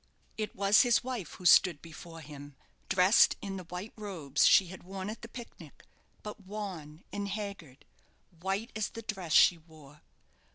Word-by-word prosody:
It 215 -1 -4
was 200 +2 +5
his 245 -2 +3
wife 245 -10 -5
who 180 - -12
stood 175 -2 +6
before 165 +1 -11
him, 145 -2 -11 0.3
dressed 185 +3 +5
in 195 -2 -5
the 185 - -8
white 180 +5 -7
robes 175 -10 0
she 190 - +6
had 190 - -10
worn 190 +2 -6
at 225 - -9
the 230 - -8
picnic; 225 - -12 0.4
but 210 0 -8
wan 185 -6 -7
and 205 0 -3
haggard, 195 -9 -7 0.5
white 195 +6 -3
as 220 -2 -1
the 230 - -9
dress 190 -6 -5
she 170 +1 +6
wore. 155 -3 -17
190 Hz, 165 wpm, -30 LUFS, 160-210 Hz, 0.5 s, stood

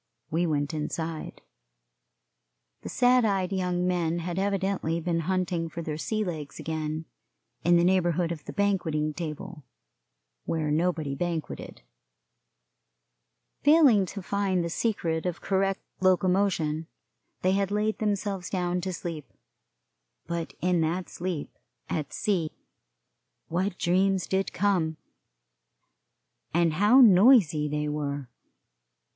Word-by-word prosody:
We 170 +3 +1
went 145 0 -1
inside. 160 +1 -4 1.4
The - - -7
sad 250 0 +4
eyed 195 -3 0
young 180 -1 0
men 175 -2 0
had 175 +1 -3
evidently 195 -4 0
been 170 0 -1
hunting 175 -1 -1
for 170 +1 -6
their 155 -1 -4
sea 215 +5 -1
legs 155 -7 -5
again, 155 0 -3 0.6
in 175 0 +5
the 170 - +3
neighborhood 175 -2 +2
of 155 -3 -6
the - - -6
banqueting 165 -7 0
table, 165 +1 -6 0.8
where 155 -2 -1
nobody 160 -2 0
banqueted. 165 - -4 1.8
Failing 280 - +6
to 200 +1 -7
find 195 -2 0
the 170 - -3
secret 170 -6 -1
of 175 -1 -3
correct 195 0 0 0.2
locomotion, 180 -4 +2 0.6
they 185 - +3
had 195 0 +1
laid 210 +1 0
themselves 200 -3 -1
down 180 -1 -1
to 185 +1 -3
sleep, 165 -4 -6 0.9
but 170 -1 -4
in 180 -1 +2
that 170 +3 -1
sleep 175 -4 -4 0.4
at 155 -3 -2
sea 185 -7 0 1.0
what 185 +3 -1
dreams 185 0 +2
did 190 0 -1
come, 175 -5 +1 1.6
and 170 -2 +3
how 210 +10 +6
noisy 190 - +6
they 150 0 -1
were! 145 -2 -3
175 Hz, 115 wpm, -27 LUFS, 160-195 Hz, 1.8 s, Failing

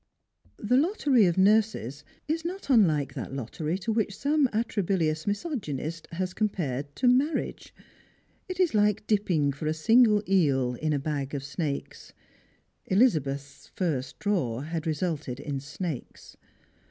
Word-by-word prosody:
The 245 +4 +2
lottery 280 - +3
of 175 - 0
nurses 195 - +2 0.2
is 320 +2 -1
not 355 -3 -4
unlike 155 - +3
that - - -6
lottery 150 +7 -3
to 200 +4 -3
which 215 -3 0
sonif 290 -1 +2
atrabilious 190 -8 -1
misogynist 170 - -3
has 185 +1 -2
compared 145 - -2
to 250 - +1
marriage. 265 +6 +1 0.8
It 370 - -5
is 365 -3 +3
lik^ 210 -2 +2
dipping 180 -10 +1
for 145 +3 -5
a 155 - 0
single 215 +5 +4
eel 140 -10 +2
in 155 +5 -2
a 145 - +2
bag 140 -1 -3
of 135 - -4
snakes. 140 0 -5 0.7
Elizabeth's 140 - +1
first 140 -8 -2
draw 135 - -1
had 160 +2 -4
resulted 155 -5 -2
in 145 -1 -4
snakes. 150 +1 -7
170 Hz, 135 wpm, -27 LUFS, 145-215 Hz, 0.8 s, single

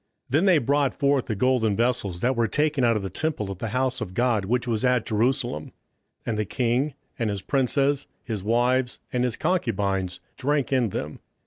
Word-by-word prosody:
27:005:003 - - -19
Then 155 +8 +3
they 185 -4 +6
brought 140 0 +1
the 110 - -1
golden 115 -2 +2
vessels 115 -7 0
that 130 +2 +2
were 115 -1 +2
taken 150 +1 +1
out 115 -1 +4
of 100 - -4
the 95 - -3
temple 110 - -2
of 95 - -7
the 115 - -3
house 125 +3 -1
of 95 -4 -5
God 120 -5 +2
which 125 +4 0
was 115 0 -1
at 125 -2 +2
Jerusalem; 120 - -1 0.5
and 110 -2 -1
the - - +2
king, 125 +6 0 0.2
and 115 -2 0
his 100 -2 -3
princes, 140 +1 +1 0.2
his 110 -6 -4
wives, 120 +3 +1 0.2
and 125 0 +1
his 125 -3 0
concubines, 100 - 0 0.2
drank 140 0 0
in 125 -4 +2
them. 75 -5 -5
120 Hz, 195 wpm, -25 LUFS, 105-135 Hz, 0.5 s, they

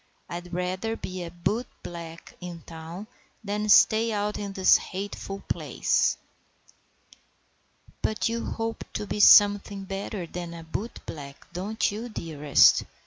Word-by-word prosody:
I'd 175 +1 -7
rather 185 +5 -2
be 185 -4 -6
a 170 - -5
bootblack 170 -4 -5
in 175 -2 -7
town 165 +4 -8 0.4
than 210 +1 -2
stay 220 +2 +6
out 210 0 -1
in 200 -1 -5
this 190 -1 +6
hateful 195 0 -6
place." - - +1 1.8
"But 215 - 0
you 230 0 -2
hope 225 0 -3
to - - -3
be 210 - -4
something 205 -1 +6
better 195 -1 -4
than 170 0 -6
a 165 - -9
bootblack, 160 -6 -6 0.2
don't 200 +6 -1
you, 225 +4 -5
dearest?" 150 -8 +4
195 Hz, 125 wpm, -27 LUFS, 170-210 Hz, 1.8 s, stay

